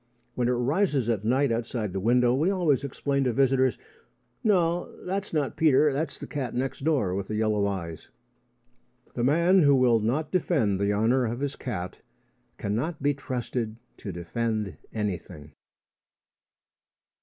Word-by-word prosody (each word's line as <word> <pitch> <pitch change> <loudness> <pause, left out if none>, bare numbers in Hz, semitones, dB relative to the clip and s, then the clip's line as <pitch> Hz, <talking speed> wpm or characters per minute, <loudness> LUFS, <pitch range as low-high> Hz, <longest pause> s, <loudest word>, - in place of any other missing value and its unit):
When 125 -1 0
it 125 - +2
rises 135 - +1
at 110 -3 0
night 130 +4 +2
outside 115 -3 -2
the 95 - -1
window, 120 +4 +3
we 150 +8 +2
always 170 -8 +1
explain 140 0 -1
to 125 - +1
visitors: 130 0 +2 0.7
"No; 175 -5 +2 0.2
that's 195 +2 -3
not 145 -7 -1
Peter. 150 -2 +4
That's 155 +4 -2
the - - -7
cat 135 -5 -4
next 135 +2 -3
door 140 - +1
with 100 0 -3
the 110 - -3
yellow 105 -2 +1
eyes." 85 -5 -5 1.0
The 120 - -2
man 170 +8 +4
who 145 -3 +5
will 125 -3 +4
not 130 +8 -1
defend 140 - +1
the 100 0 +1
honour 115 +5 +2
of 120 +2 -4
his 145 -1 -2
cat 90 -8 -5 0.6
cannot 130 +10 -2
be 145 0 +3
trusted 125 -4 -4 0.2
to 100 - -6
defend 100 +1 -3
anything. 90 -8 -5
125 Hz, 150 wpm, -27 LUFS, 110-145 Hz, 1.0 s, who